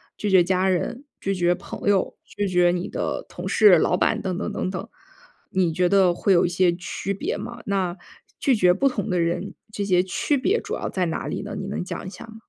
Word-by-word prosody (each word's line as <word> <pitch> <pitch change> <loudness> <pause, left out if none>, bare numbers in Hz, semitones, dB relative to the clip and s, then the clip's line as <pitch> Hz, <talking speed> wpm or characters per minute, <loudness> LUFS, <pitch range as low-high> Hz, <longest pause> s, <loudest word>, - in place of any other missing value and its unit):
拒 210 - -2
绝 190 -1 +7
家 185 +2 +1
人、 230 +8 -1 0.2
拒 195 0 -1
绝 175 -1 +2
朋 195 +2 -4
友、 195 -2 +1
拒 205 -1 -3
绝 180 -1 +3
你 175 +1 -2
的 - - -3
同 - - -6
事、 205 -5 +7
老 180 +3 +2
板 - - +1
等 185 -2 -2
等 210 - -3
等 - - -2
等， 190 +3 -5 0.6
你 180 -3 +1
觉 180 +2 +2
得 190 -2 +4
会 195 - +1
有 175 -2 +5
一 - - 0
些 180 0 +2
区 180 +2 -4
别 200 - -3
吗？ 235 -1 -7
那 190 -3 -1 0.4
拒 270 -4 +3
绝 180 -4 +4
不 205 +9 +2
同 220 -6 -2
的 180 -2 +1
人， 170 +4 -1 0.2
这 205 - -2
些 185 -3 +3
区 190 +10 0
别 385 - +1
主 - - -4
要 - - -4
在 185 -2 -1
哪 165 - -3
里 - - -3
呢？ 205 +1 -6
你 195 -1 -5
能 200 - -3
讲 180 - -6
一 - - -4
下 - - -10
吗？ 225 -1 -13
190 Hz, 255 characters per minute, -24 LUFS, 180-205 Hz, 0.6 s, 绝